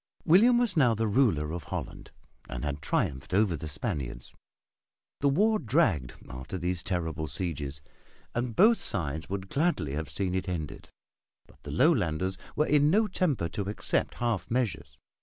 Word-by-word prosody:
William 220 +9 +6
was 240 -2 +2
now 125 -7 +4
the 115 +1 0
ruler 100 - +2
of 85 -2 -5
Holland - - -6 0.4
and 60 +1 -4
had 75 0 -3
triumphed 70 +3 -1
over 100 -4 +3
the 80 +1 -6
Spaniards. 65 -4 -4 0.9
The 140 - +3
war 210 +9 +3
dragged 115 - +1
after 65 +9 -6
these 90 0 -2
terrible 80 -5 -2
sieges 75 -2 -3 0.5
and 120 -1 -2
both 225 +4 +6
sides 80 -4 -3
would 95 0 -4
gladly 140 - 0
have 75 -1 -3
seen 90 +4 -2
it 95 0 -2
ended; 80 -5 -5 0.6
but 70 - -22
the 75 - -9
Lowlanders 95 - +2 0.2
were 150 - +2
in 145 0 +4
no 215 +6 +4
temper 160 - 0
to 100 +4 -4
accept 105 - -1
half 115 -7 -1
measures. 120 -3 -2
95 Hz, 160 wpm, -29 LUFS, -, 0.9 s, William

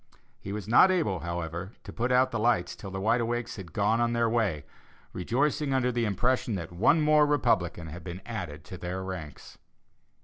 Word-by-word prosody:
He 100 - -7
was 105 -1 -5
not 125 - +7
able, 160 - +1
however, 85 +3 -5
to - - -9
put 120 +2 -1
out 130 +1 +4
the 115 - -2
lights 110 -5 +1
till 100 - -8
the 95 0 -5
Wide 115 +4 +2
Awakes 120 0 -2
had 90 -5 -9
gone 105 +6 +1
on 120 0 +1
their 115 0 +2
way 110 -10 0 0.5
rejoicing 135 - 0
under 125 -1 +2
the 120 -1 0
impression 115 +2 0
that 85 -3 -5
one 115 - +3
more 150 0 +5
Republican 95 - +1
had 85 +2 -8
been 85 +3 -7
added 90 -10 -6
to 90 - -9
their 90 +2 -4
ranks. 90 -7 -8
110 Hz, 195 wpm, -28 LUFS, 90-120 Hz, 0.5 s, not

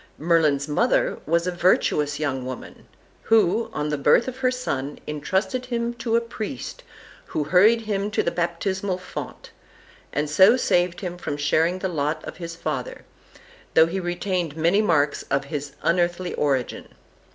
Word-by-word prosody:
Merlin's 155 -4 +2
mother 150 - +1
was 170 +2 +2
a 180 - 0
virtuous 150 -5 +2
young 135 -4 -2
woman, 130 0 -8 0.3
who, 220 0 +3
on 150 0 -2
the 150 -1 -1
birth 185 - +4
of 260 0 -5
her 260 -1 +2
son, 145 - -3
intrusted 190 - -2
him 235 -1 -1
to 230 -1 -2
a 235 - +4
priest, 220 - -6 0.5
who 150 - -2
hurried 200 +9 +5
him 205 -2 -2
to 210 - 0
the 170 - 0
baptismal 185 +2 -1
fount, 185 - -8 0.6
and 150 +2 -1
so 190 - +6
saved 175 -7 +1
him 180 -2 -5
from 145 -4 -4
sharing 160 +4 +2
the 190 - -2
lot 155 -2 -2
of - - -8
his 170 -1 -6
father, 155 -6 -4 0.7
though 160 - +8
he 175 +4 -3
retained 175 -3 -2
many 170 +6 +3
marks 150 -8 +2
of 140 0 0
his 145 -1 -5
unearthly 175 +1 +1
origin. 135 -4 -2
170 Hz, 160 wpm, -24 LUFS, 150-195 Hz, 0.7 s, though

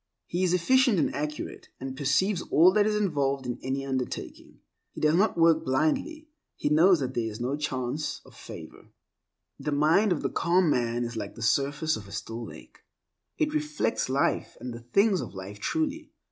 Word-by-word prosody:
He 175 - -3
is 180 - +2
efficient 255 +4 +3
and 155 - +1
accurate, 150 +1 -5
and 130 0 -5
perceives 170 +8 +1
all 170 +5 +6
that 210 +1 +3
is 215 - +1
involved 140 -9 0
in 120 -1 -4
any 135 +1 -3
undertaking. 130 -2 -5 0.3
He - - -8
does 155 0 +3
not 190 +2 +2
work 165 -1 +4
blindly; 160 - 0 0.3
he - - -1
knows 165 +2 +5
that 130 -1 -2
there 115 -2 -1
is 105 - -8
no 125 +4 -1
chance 145 0 -3
of - - -17
favor. - - -11 0.7
The 150 - -3
mind 155 +8 +3
of 170 - 0
the - - -1
calm 170 -1 +2
man 120 -1 0
is 120 0 -5
like - - -5
the 115 - -7
surface 145 +5 +1
of 105 -2 -10
a - - -13
still 115 +3 -5
lake; - - -12 0.6
it 305 -1 0
reflects 300 - -1
life 135 +2 0
and 125 +1 -6
the 115 - -8
things 190 - +2
of - - -8
life 95 +2 -8
truly. 315 - -2
150 Hz, 190 wpm, -27 LUFS, 130-185 Hz, 0.7 s, all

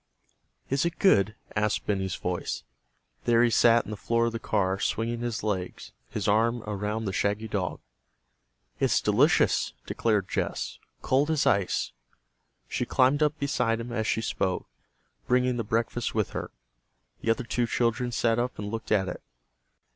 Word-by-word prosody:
"Is 135 +2 +1
it 170 0 -1
good?" 105 - +4 0.2
asked 105 0 0
Benny's 95 -3 -1
voice. 90 -1 -3 0.6
There 120 0 +5
he 120 - +3
sat 115 0 +5
in - - -7
the 105 - -6
door 115 0 +3
of 115 - 0
the 115 - -4
car, 95 -4 0
swinging 115 +3 -1
his 120 -3 -3
legs, 95 -4 -3 0.2
his - - -3
arm 115 +3 +2
around 105 +2 -3
the 95 - -2
shaggy 105 +3 0
dog. 100 -4 -2 1.0
"It's - - +3
delicious!" - - +3
declared 105 -5 0
Jess. - - -3 0.2
"Cold 140 +4 +2
as 155 -3 +2
ice." 100 - +1 0.8
She - - -2
climbed 130 +3 +3
up 150 0 +2
beside 125 -5 0
him 120 +1 -6
as 110 -2 -1
she 110 - +1
spoke, 95 -4 -1 0.6
bringing 125 0 +2
the 115 - -1
breakfast 115 +2 -1
with 110 -3 0
her. - - -4 0.7
The - - -2
other 115 +2 +2
two 120 0 -1
children 120 +1 0
sat 115 0 +1
up 125 +1 -2
and 105 0 -5
looked 115 0 -5
at 100 -3 +3
it. - - -5
115 Hz, 160 wpm, -27 LUFS, 105-120 Hz, 1.0 s, There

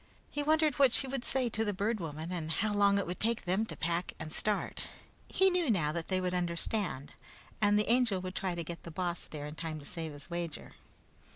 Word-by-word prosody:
He 290 - -1
wondered 310 -1 +3
what 270 -3 +7
she 270 - +3
would 265 -1 -3
say 260 -1 +1
to 225 0 0
the 205 -3 -1
Bird 210 +3 0
Woman, 160 0 -5
and 165 -3 -3
how 205 +6 0
long 200 -1 +4
it 200 - +1
would 175 +1 -4
take 230 -1 0
them 190 +5 +1
to - - -6
pack 170 +1 -1
and 155 0 -6
start. 210 +5 -1 0.5
He 380 0 +4
knew 355 -5 +1
now 165 -9 +2
that 165 0 -3
they 185 -1 +1
would 180 -1 -1
understand, 175 -3 -1 0.5
and 205 0 +5
the 210 - +2
Angel 235 -5 +3
would 185 0 -5
try 185 -2 -1
to 170 - -2
get 170 +1 -7
the - - -8
Boss 175 +1 -2
there 145 -2 -6
in 150 - -6
time 160 0 -4
to 145 - -10
save 165 -1 -3
his 145 -1 -10
wager. 170 -2 -4
185 Hz, 235 wpm, -32 LUFS, 170-220 Hz, 0.5 s, what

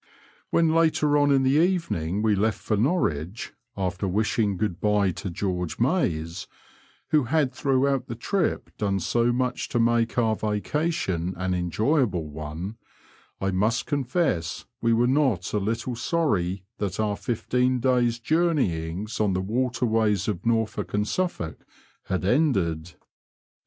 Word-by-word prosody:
When 165 -1 +3
later 160 -2 +3
on 145 0 +4
in 135 -1 +4
the 140 +5 +4
evening 105 - 0
we 110 -1 +3
left 105 +2 +1
for 110 - -1
Norwich 105 - -1 0.2
(after 95 0 -2
wishing 105 +1 +1
good 90 -3 -2
bye 105 -2 +2
to 95 - -5
George 90 -1 -3
Mayes, 90 - 0 0.6
who 150 -4 +3
had 140 0 +1
throughout 135 -1 +1
the 115 - -5
Mp 175 - -1
done 100 -2 0
so 115 +8 +1
much 125 0 -1
to 120 - 0
make 115 0 +2
our 110 -2 +3
vacation 105 - -1
an 95 0 -1
enjoyable 90 - +1
one), 80 +7 -6 0.6
I 95 0 0
must 105 +5 +1
confess 130 - -1 0.2
we 115 - +2
were 115 +1 +3
not 125 - +1
a 105 - +2
little 115 +4 -2
sorry 100 - 0 0.2
that 100 -2 -3
our 105 -1 +1
fifteen 125 +2 0
days* 120 -2 +2
joumeyings 110 - 0
on 100 -3 +2
the 90 - 0
waterways 110 -2 0
of 95 -5 -2
Norfolk 115 -3 0
and 105 0 0
Suffolk 170 - -2 0.4
had 95 -1 -2
ended. 95 - +1
110 Hz, 140 wpm, -25 LUFS, 95-130 Hz, 0.6 s, on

